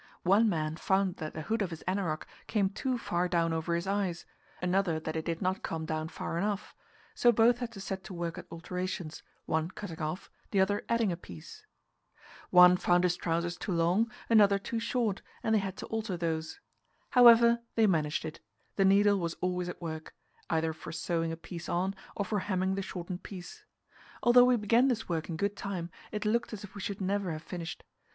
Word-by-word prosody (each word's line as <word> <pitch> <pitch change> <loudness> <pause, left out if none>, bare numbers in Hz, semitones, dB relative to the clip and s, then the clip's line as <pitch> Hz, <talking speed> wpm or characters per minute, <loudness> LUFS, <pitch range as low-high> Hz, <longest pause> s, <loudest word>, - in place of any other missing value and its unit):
One 205 +5 +5
man 155 -3 -1
found 190 0 +1
that 155 -1 -6
the 155 - -4
hood 225 +6 -1
of 195 - 0
his 165 -2 -8
anorak 185 -5 -1 0.2
came 200 -3 +1
too 255 +5 -1
far 180 -6 -1
down 170 -2 +1
over 165 +1 -1
his 170 +2 -2
eyes, 195 -3 -1 0.3
another 180 -2 +1
that 160 0 -5
it 160 - -2
did 170 +2 -2
not 185 +1 0
come 160 -1 -3
down 155 0 -2
far 165 +1 -4
enough; 205 +1 -2 0.4
so 240 - +5
both 235 +2 +4
had 245 -2 -4
to 195 - -9
set 190 0 -5
to - - -7
work 170 -1 -3
at - - -11
alterations, 180 -1 -4 0.2
one 160 +1 0
cutting 180 -4 -7
off, 155 +4 -4 0.2
the 200 - +1
other 205 +2 +2
adding 230 -4 +2
a - - -1
piece. 85 - -12 0.8
One 180 0 +8
found 175 0 +3
his 180 -1 +2
trousers 170 0 -1
too 195 - -3
long, 175 +7 +2 0.2
another 205 -3 +6
too 225 +3 -3
short, 225 -4 -1 0.2
and 220 - +1
they 220 - +5
had 195 -1 -4
to - - -6
alter 220 -4 -3
those. 160 - -3 0.5
However, 235 -1 +7 0.2
they 225 - +5
managed 160 -6 +1
it; 160 +1 -6 0.4
the 195 - +4
needle 200 +1 +5
was 170 -1 -2
always 180 -1 -2
at 180 - -8
work, 160 -1 -6 0.3
either 160 -1 +1
for 160 - -9
sewing 165 0 -1
a 165 - -4
piece 170 0 -8
on, 185 +3 0 0.2
or 200 - -1
for 210 0 -1
hemming 190 -1 0
the 195 - -1
shortened 180 -1 -6
piece. 205 - -9 0.6
Although 245 +1 +7
we 250 0 +5
began 230 +4 +3
this 235 -4 -1
work 165 -1 -2
in 165 - -3
good 200 +3 -1
time, 185 -4 -4 0.2
it 210 0 -3
looked 235 +2 0
as 210 0 -6
if 195 - -10
we 205 - -7
should 200 +1 -4
never 195 -1 0
have 155 +1 -7
finished. 175 -2 -6
185 Hz, 205 wpm, -30 LUFS, 170-205 Hz, 0.8 s, One